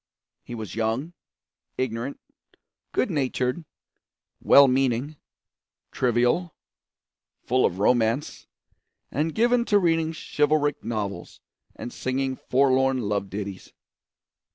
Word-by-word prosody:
He 120 - -8
was 110 -5 -7
young, 115 +9 -2 0.6
ignorant, 130 +1 -3 0.7
good 255 - 0
natured, 130 0 -1 0.8
well 140 0 +7
meaning, 130 +2 0 0.8
trivial, 125 +8 +1 0.9
full 130 +1 +3
of 90 - -6
romance, 115 +5 +1 0.6
and 150 +4 -1
given 240 +2 +3
to 205 - +3
reading 165 -4 +2
chivalric 150 -1 0
novels 105 -3 -4 0.4
and 120 - -7
singing 130 +1 -2
forlorn 130 -1 +3
love 100 -1 -2
ditties. 100 -1 -7
130 Hz, 95 wpm, -25 LUFS, 115-150 Hz, 0.9 s, well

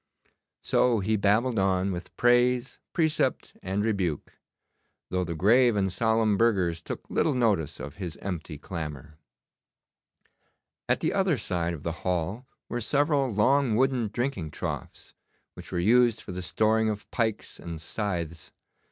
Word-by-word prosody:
So 120 -3 +3
he 105 +3 +1
babbled 110 +3 +2
on 95 0 +1
with 90 0 -7
praise, 120 +1 +3
precept, 160 -3 0
and 100 +3 -1
rebuke, 95 -9 -2 0.7
though 90 0 0
the 85 -1 -4
grave 115 +7 +4
and 95 -3 0
solemn 110 -2 +2
burghers 95 -8 +2
took - - -7
little 150 - +1
notice 100 - +1
of 75 +2 -8
his 90 -5 -5
empty 85 -5 -5
clamour. 75 -2 -7 1.7
At - - +2
the - - 0
other 190 -6 +2
side 85 -5 -1
of 75 - -11
the 85 - -1
hall 90 +7 -2 0.2
were 120 - -3
several 145 +2 +2
long 120 +3 +3
wooden 130 -1 +2
drinking 120 - -3
troughs, - - -6 0.4
which - - -11
were - - -2
used 115 +5 +4
for - - -8
the 90 +1 -5
storing 110 +4 +2
of 105 -1 -5
pikes 110 -3 -2
and 85 -1 -7
scythes. 85 -3 -4
105 Hz, 145 wpm, -27 LUFS, 85-120 Hz, 1.7 s, grave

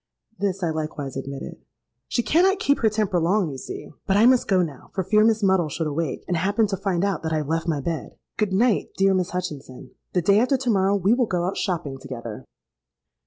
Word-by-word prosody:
'—This 195 -1 -1
I 165 - +1
likewise 155 -3 -4
admitted.—'She 135 - -6
cannot 365 - +3
keep 280 -5 +1
her 220 - +3
temper 210 -4 0
long, 175 0 +1
you 135 - -7
see. - - -8 0.2
But 195 - +3
I 215 - +6
must 255 0 +4
go 190 -3 +3
now, 145 -6 -8
for 190 - 0
fear 210 +4 +4
Miss 220 -1 +2
Muddle 190 -5 +3
should 160 +3 -3
awake, 155 +1 -3
and 180 - 0
happen 200 +6 +2
to 195 - 0
find 190 -1 0
out 195 -5 -1
that 160 - -3
I - - +2
have 150 -2 -3
left 165 +1 -1
my 150 -4 0
bed. 165 +2 -4 0.2
Good 210 -3 0
night, 220 +3 +1
dear 195 0 +4
Miss 185 -1 0
Hutchinson. 150 -8 -6 0.2
The 180 - +1
day 200 +4 +5
after 255 +4 +2
to 255 -1 -3
morrow 195 -1 +2
we 200 +2 +3
will 245 -1 +2
go 175 -3 -1
out 190 - -2
shopping 160 -8 -2
together.' 120 -5 -7
185 Hz, 220 wpm, -24 LUFS, 160-210 Hz, 0.2 s, I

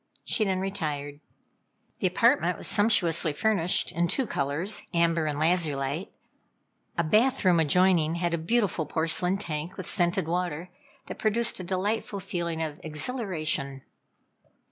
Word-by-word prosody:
She 220 - +2
then 190 -2 0
retired. 150 -7 -3 0.8
The - - +2
apartment - - +2
was - - -5
sumptuously 175 -7 +3
furnished 180 -1 +1
in 170 +2 0
two 265 +9 +1
colors 155 +4 -2
amber 165 -1 +2
and 145 -1 -2
lazulite. 155 -1 0 0.9
A 170 - +2
bath 215 +9 +2
room 175 -2 +5
adjoining 165 0 +3
had 170 0 -1
a 170 - 0
beautiful 190 -3 0
porcelain 175 +3 +1
tank 165 -3 -5
with 185 - -6
scented 175 -3 +2
water, 175 0 -3 0.3
that - - -8
produced 225 +1 +1
a - - -5
delightful 200 +3 -2
feeling 170 -3 -3
of 150 -1 -5
exhilaration. 155 - -3
170 Hz, 135 wpm, -27 LUFS, 155-195 Hz, 0.9 s, room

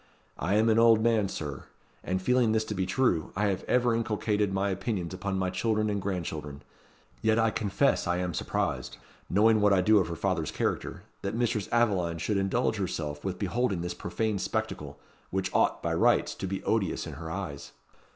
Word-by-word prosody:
I 95 +6 +1
am 110 +2 +4
an 110 0 +4
old 115 -1 +6
man, 110 -4 +2
Sir; 75 -7 -5 0.4
and 95 +1 -1
feeling 125 0 +3
this 110 0 +2
to 110 - -4
be 95 -2 -1
true, 95 -7 +1
I 105 +2 +1
have 95 - -2
ever 125 -1 +2
inculcated 105 -2 0
my 95 +1 0
opinions 95 -2 -3
upon 95 +1 -3
my 95 -1 0
children 110 +2 0
and 100 -1 -1
grandchildren. 80 -7 -4 0.6
Yet 110 0 +3
I 115 -1 +3
confess 100 -5 +1
I 90 0 +1
am 90 -1 -2
surprised - - -2 0.3
knowing 110 +3 +4
what 105 -1 +5
I 95 - +4
do 105 +3 +5
of 95 - 0
her 85 - -4
father's 85 -3 -1
character - - -2 0.2
that 100 +2 -3
Mistress 115 -4 0
Aveline 95 -8 +2
should 100 +5 -1
indulge 105 +4 +1
herself 75 -6 -3
with 95 -2 -3
beholding 100 -1 0
this 90 0 -3
profane 105 +4 -2
spectacle, - - -3 0.3
which 95 0 -2
ought, - - +2
by - - 0
rights, - - +3
to 95 - -5
be 95 +1 -4
odious 100 -6 0
in 80 - -7
her 80 +3 -7
eyes." 80 -6 -5
100 Hz, 190 wpm, -28 LUFS, 90-110 Hz, 0.6 s, old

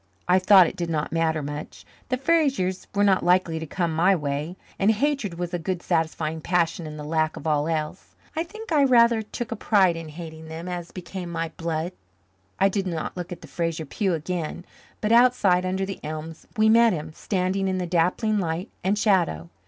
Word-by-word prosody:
I 180 +1 +5
thought 185 -1 +7
it - - -4
did 170 -1 -3
not 155 -2 -1
matter 160 -2 0
much. 145 +1 -7 0.2
The 255 - +1
Frasers 270 - +1
were 205 - +3
not 195 -2 +3
likely 175 -2 +2
to 160 - -6
come 170 +1 -1
my 185 +4 +4
way, 150 +2 -3 0.2
and 195 - +3
hatred 225 -4 0
was 175 0 -4
a 175 - -1
good 180 +1 -3
satisfying 160 -2 -1
passion 170 -1 0
in 150 0 -8
the 150 - -6
lack 155 +1 0
of - - -9
all 150 -1 +1
else. 155 +1 -4 0.2
I 320 - 0
think 435 +4 -10
I 300 -3 +4
rather 235 -3 +5
took 230 +2 -6
a - - -1
pride 195 -5 +3
in 165 -1 -7
hating 160 0 -9
them 160 +2 -7
as 175 -1 -5
became 180 0 -7
my 165 -1 -3
blood. 165 0 -2 0.7
I 195 - +5
did 195 -1 -1
not 165 -3 -3
look 180 -1 -6
at 175 - -7
the - - -11
Fraser 165 -2 -2
pew 190 +4 -1
again, 170 +1 -4 0.4
but 215 - 0
outside, 230 -7 +4
under 190 +1 -1
the 195 0 -6
elms, 155 +1 -7
we 215 0 +4
met 230 0 +6
him, 155 -1 -5
standing 190 +1 -1
in 190 0 0
the 180 - -2
dappling 180 +5 +1
light 170 +3 -3
and 195 +3 +1
shadow. 175 - +1
180 Hz, 205 wpm, -25 LUFS, 160-200 Hz, 0.7 s, thought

